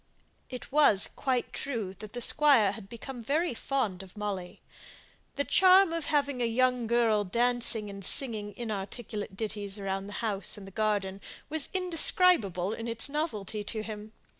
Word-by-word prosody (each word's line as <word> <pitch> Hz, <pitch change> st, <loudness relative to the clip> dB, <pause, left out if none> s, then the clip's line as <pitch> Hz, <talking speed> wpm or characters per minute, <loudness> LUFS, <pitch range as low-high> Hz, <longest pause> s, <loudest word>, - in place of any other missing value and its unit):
It 250 Hz, 0 st, -9 dB
was 275 Hz, -9 st, +5 dB
quite 255 Hz, -3 st, -2 dB
true 225 Hz, -9 st, -4 dB
that 215 Hz, -1 st, -9 dB
the 245 Hz, -, -5 dB
Squire 270 Hz, -7 st, +5 dB
had 200 Hz, -2 st, -10 dB
become 240 Hz, +2 st, -8 dB
very 300 Hz, +7 st, 0 dB
fond 230 Hz, -7 st, -2 dB
of 190 Hz, +2 st, -14 dB
Molly. 200 Hz, -4 st, -5 dB, 0.8 s
The 285 Hz, -, 0 dB
charm 375 Hz, +1 st, +5 dB
of 330 Hz, -2 st, -3 dB
having 285 Hz, -4 st, 0 dB
a -, -, +2 dB
young 250 Hz, 0 st, +1 dB
girl 225 Hz, -3 st, +2 dB
dancing 235 Hz, +1 st, +1 dB
and 200 Hz, -1 st, -9 dB
singing 210 Hz, -2 st, +3 dB
inarticulate 210 Hz, -2 st, -5 dB
ditties 205 Hz, -2 st, -4 dB
about 195 Hz, 0 st, -4 dB
the 205 Hz, -, -9 dB
house 205 Hz, -4 st, -2 dB
and 195 Hz, -2 st, -11 dB
garden, 200 Hz, -2 st, -1 dB, 0.3 s
was 310 Hz, -1 st, 0 dB
indescribable 330 Hz, -, +2 dB
in 230 Hz, +1 st, -6 dB
its 230 Hz, +4 st, -1 dB
novelty 220 Hz, -, -3 dB
to 215 Hz, 0 st, -5 dB
him. 215 Hz, 0 st, -8 dB
225 Hz, 155 wpm, -29 LUFS, 205-270 Hz, 0.8 s, was